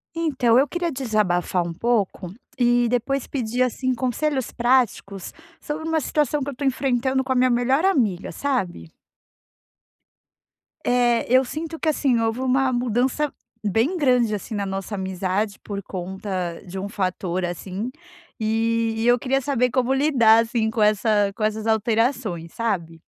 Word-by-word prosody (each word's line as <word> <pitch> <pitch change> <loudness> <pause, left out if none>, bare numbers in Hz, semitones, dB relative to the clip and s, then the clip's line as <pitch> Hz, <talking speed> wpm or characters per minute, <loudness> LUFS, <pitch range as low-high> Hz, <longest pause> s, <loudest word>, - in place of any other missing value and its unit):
Então, 265 -8 +2
eu 275 +3 +4
queria 350 0 -2
desabafar 210 - 0
um 165 - -5
pouco 200 -4 -1 0.2
e 240 -1 +3
depois 250 +3 -1
pedir, 245 -2 -2
assim, 255 +1 +1
conselhos 260 +1 -1
práticos 235 -6 0 0.3
sobre 310 +1 -4
uma 320 0 +1
situação 295 +1 0
que 275 - -3
eu - - -3
estou 280 +2 -5
enfrentando 260 0 +1
com 260 - -4
a - - +2
minha 255 0 +4
melhor 255 +7 +2
amiga, 225 - +1
sabe? 190 - -2 2.0
É, 245 -1 +2
eu 260 +1 +6
sinto 315 +5 -5
que, 320 - +1
assim, 270 -5 +2
houve 225 +1 0
uma 260 0 +2
mudança 250 +4 0 0.3
bem 225 - +1
grande 250 -7 +3
assim, 210 +3 -7
na 200 -1 -1
nossa 195 +2 -4
amizade, 190 +2 -2
por 200 -1 -6
conta 185 -1 -4
de 190 +1 -6
um 200 - -4
fator 185 -2 -2
assim, 185 +5 -4 0.5
e 225 +1 +1
e 225 - 0
eu 245 0 +6
queria 270 +2 0
saber 250 -2 +1
como 255 +1 +1
lidar 240 -6 +5
assim 225 -1 -1
com 220 0 -2
essa 210 -1 +3
com 215 - -4
essas 215 0 -1
alterações, 220 -5 0
sabe? 170 -8 -3
235 Hz, 155 wpm, -23 LUFS, 205-260 Hz, 2.0 s, eu